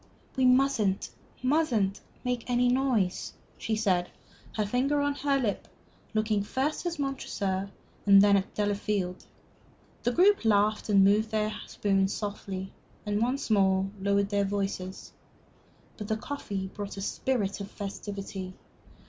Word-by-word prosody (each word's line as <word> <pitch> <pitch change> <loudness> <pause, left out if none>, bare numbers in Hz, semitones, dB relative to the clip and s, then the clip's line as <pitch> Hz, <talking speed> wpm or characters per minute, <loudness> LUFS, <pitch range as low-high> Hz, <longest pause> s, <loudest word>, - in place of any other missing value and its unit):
"We 260 -1 +2
mustn't, 250 -6 +3 0.3
mustn't 255 -9 +1 0.2
make 250 -1 -2
any 245 0 +3
noise!" 245 -8 +1 0.3
she 220 - -1
said, 185 -5 +1 0.5
her 215 - +1
finger 260 +7 +1
on 285 0 +1
her 280 0 +1
lip, 230 -7 -2 0.5
looking 215 -1 +1
first 265 - -1
at 340 -1 -3
Montresor 200 -9 -2 0.4
and 200 -1 +9
then 200 0 +6
at 195 0 0
Delafield. 205 -3 -1 0.7
The 245 - +1
group 390 +6 +4
laughed, 215 0 +2
moved 205 +2 +5
their 215 -1 0
spoons 195 -1 +1
softly, 195 -2 -5 0.3
and 210 0 0
once 250 +1 0
more 195 -1 +3
lowered 200 0 +2
their 200 -1 +1
voices. 195 -1 -3 0.8
But 210 - -6
the 220 - 0
coffee 210 -7 -4
brought 205 -1 -6
a - - -4
spirit 205 -2 -1
of 200 - -6
festivity. 195 -2 -6
210 Hz, 130 wpm, -28 LUFS, 195-250 Hz, 0.8 s, and